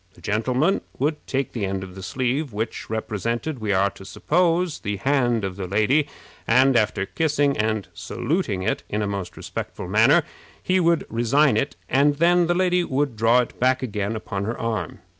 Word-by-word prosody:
The - - -18
gentleman 125 - +1 0.2
would 150 +3 0
take 135 0 -1
the 115 - -4
end 95 0 -2
of 95 -1 -9
the 95 - -9
sleeve, 130 - -1
which 110 +3 -4
represented, 115 +6 -3
we 110 -2 -2
are 100 +1 +2
to - - -13
suppose, 170 - 0
the 105 0 -3
hand 120 -2 +1
of 95 -1 -4
the 95 -2 -4
lady, 110 +10 +2 0.4
and, 130 +3 +4
after 105 -3 +1
kissing 145 0 +1
and 110 -2 -1
saluting 100 - -2
it 110 - -1
in 105 +1 -1
a - - -1
most 100 -3 -5
respectful - - -6
manner, - - +5 0.4
he 185 0 +2
would 170 -2 +2
resign 120 +3 +2
it, 85 -6 -1
and 145 +2 +3
then 170 +2 +3
the 175 - +1
lady 180 -1 +2
would 140 -4 -1
draw 115 +3 +4
it 120 - -7
back 130 +1 +2
again 105 -2 -2
upon 100 -2 -4
her 115 +3 -3
arm. 110 -8 -3
120 Hz, 185 wpm, -23 LUFS, 105-145 Hz, 0.4 s, manner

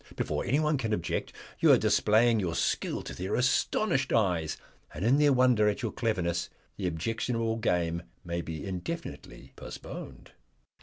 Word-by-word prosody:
Before - - -2
anyone 150 +2 +1
can 110 -4 -1
object 85 - -2 0.3
you - - +6
are - - +8
displaying 115 +2 +3
your 85 -4 -1
skill - - -1
to - - -7
their 95 +2 -3
astonished 135 +3 +1
eyes, 90 -8 +1 0.4
and 95 - -3
in 130 +5 +4
their 145 -1 +5
wonder 125 -5 +4
at 105 +4 -3
your 115 - -1
cleverness 90 -7 -1 0.3
the 95 - -2
objectionable 115 +6 -1
game 85 -6 0 0.2
may 85 0 -2
be 80 0 -6
indefinitely 100 - -6
postponed." - - -9
110 Hz, 150 wpm, -29 LUFS, 90-125 Hz, 0.4 s, are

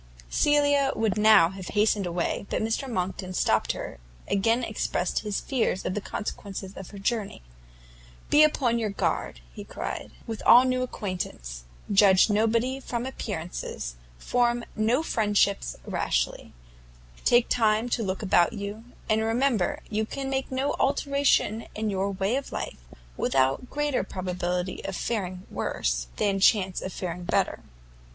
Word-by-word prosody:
Cecilia 285 -2 +3
would 220 -2 +1
now 215 -6 +6
have 190 -1 -8
hastened 210 -2 +2
away, 175 +3 -2
but - - -1
Mr 225 +5 -1
Monckton, 185 -3 -3
stopping - - +2
her, - - -7 0.3
again 225 +5 +2
expressed 205 -5 -1
his 210 -2 -2
fears 235 -8 -1
of - - -1
the 210 - -2
consequences 195 -2 -5
of 190 - -8
her 205 - -10
journey; 200 - -2 0.9
"Be 295 - +7
upon 260 -6 +3
your 220 -2 -1
guard," 125 - -2
he - - -8
cried, - - -5 0.2
"with 225 -2 -5
all 245 +2 +8
new 255 0 +1
acquaintance; 175 - -5 0.3
judge 200 0 +6
nobody 230 +5 +1
from 240 -2 -4
appearances; 175 - -5 0.2
form 240 - +1
no 230 +7 +2
friendship 205 -6 +2 0.3
rashly; - - -1 0.7
take 240 0 +4
time 220 0 +2
to 235 - 0
look 190 -1 -2
about 175 -3 +3
you, 205 +2 -6 0.2
and 215 0 +2
remember 225 -2 +1
you 215 0 -1
can 270 +1 -4
make 265 0 -2
no 265 +2 0
alteration 280 -5 +2
in 215 0 -1
your 195 +1 0
way 195 +4 0
of 275 - -5
life, - - -5 0.4
without 135 - +1
greater 295 -5 0
probability 180 -1 -3
of 195 - -4
faring 185 -5 -3
worse, - - -1
than 195 -1 +1
chance 190 -2 +3
of 190 - -5
faring 180 -1 -5
better. - - 0
210 Hz, 145 wpm, -27 LUFS, 185-240 Hz, 0.9 s, all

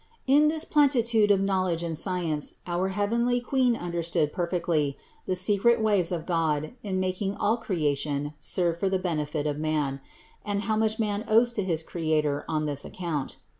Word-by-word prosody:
61. 275 +3 +5
In 300 - +5
this 315 +1 0
plenitude 235 -7 +3
of 200 -1 +4
knowledge 185 -3 0
and 165 -1 -3
science 165 -3 -2
our 175 +1 -1
heavenly 235 +5 +1
Queen 250 -1 +1
understood 170 -4 -1
perfectly 170 -5 0 0.3
the 185 - 0
secret 205 +5 +3
ways 205 -6 +2
of 165 -2 -3
God 160 -2 0
in 190 -3 -2
making 185 +2 -1
all 220 +3 +1
creation 145 -7 -1
serve 170 -2 -1
for 195 - +1
the 190 - +1
benefit 155 -4 -2
of 150 -1 -1
man, 150 -3 -1 0.4
and 205 0 -2
how 220 -1 0
much 220 0 +1
man 210 -1 -1
owes 235 +2 +4
to 210 - -1
his 165 -4 -1
Creator 155 -4 -1
on 155 -1 0
this 145 -1 -1
account. 165 -7 -4
180 Hz, 170 wpm, -27 LUFS, 155-215 Hz, 0.4 s, 61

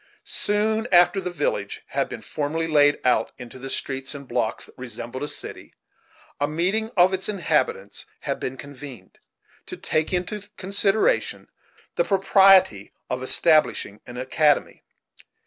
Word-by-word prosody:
Soon 215 +2 0
after 180 +2 +5
the 180 - -3
village - - -3
had - - -1
been - - -7
formally 155 +2 -2
laid 145 -2 +4
out 125 - +2
into 125 0 -10
the 135 +1 -7
streets 135 +1 -2
and 140 -1 -9
blocks 110 -2 -2
that - - -16
resembled 120 0 -6
a 145 - -2
city, - - -6 0.6
a 145 - +1
meeting 185 +8 0
of 180 +2 +5
its 190 +2 -1
inhabitants 460 - -1
had - - -3
been 130 +1 -4
convened, 140 -2 -11 0.5
to - - -7
take 155 0 -1
into 200 +3 -3
consideration 200 +2 +1 0.5
the - - +4
propriety 190 - +4 0.2
of 125 0 -2
establishing 150 -6 +2
an 120 0 -9
academy. 145 +4 +1
155 Hz, 140 wpm, -24 LUFS, 130-195 Hz, 0.6 s, after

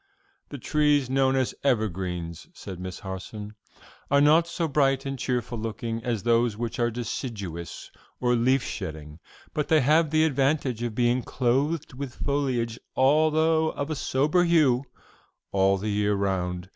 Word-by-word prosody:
"The 145 - -6
trees 145 0 +1
known 135 0 +3
as 130 -2 0
evergreens," 90 - -2
said 95 -2 -8
Miss 90 0 -6
Harson, 105 +2 -7 0.6
"are 140 - +4
not 155 +4 +5
so 170 0 -2
bright 135 -2 +2
and 135 -1 -4
cheerful 120 -2 -2
looking 115 +1 -4
as 115 -5 -2
those 115 -2 +2
which 120 +1 -4
are 120 0 +2
deciduous, 105 -7 -5 0.3
or 125 -1 +2
leaf 125 +3 +2
shedding, 80 -5 -6 0.3
but 150 - -1
they 155 -2 +4
have 155 +4 +3
the 155 +1 +3
advantage 135 -4 +1
of 120 -3 -3
being 120 +1 +2
clothed 135 +6 0
with 130 -1 -6
foliage, 125 -5 -1 0.2
although 155 +3 +3
of 145 +2 -4
a - - -1
sober 150 +6 +1
hue, 150 -7 +3 0.7
all 95 0 +3
the 105 +3 -3
year 105 0 +1
round. 90 -2 -2
125 Hz, 150 wpm, -26 LUFS, 105-140 Hz, 0.7 s, not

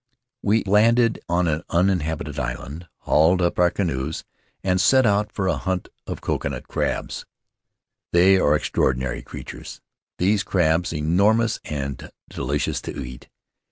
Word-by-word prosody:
We 110 +2 +2
landed 115 +4 +3
on 85 +1 +2
an 80 0 0
uninhabited 80 -5 0
island, 65 +7 -5
hauled 80 +5 +3
up 85 -1 0
our 90 0 +5
canoes, 80 -5 -2 0.4
and 95 -1 +2
set 130 +4 +5
out 105 0 +2
on 95 -2 0
a - - +1
hunt 95 -1 -3 0.2
for - - -3
coconut - - -3
crabs. - - -3 0.8
"They 95 +2 +5
are 75 -4 +3
extraordinary 65 -4 0
creatures, - - -9 0.4
these 100 +3 +2
crabs, 85 -3 +1
enormous, 100 +9 +2
and 70 -3 -5 0.2
delicious 70 +3 -2
to - - -6
eat. 60 -1 -8
85 Hz, 130 wpm, -23 LUFS, 75-100 Hz, 0.8 s, our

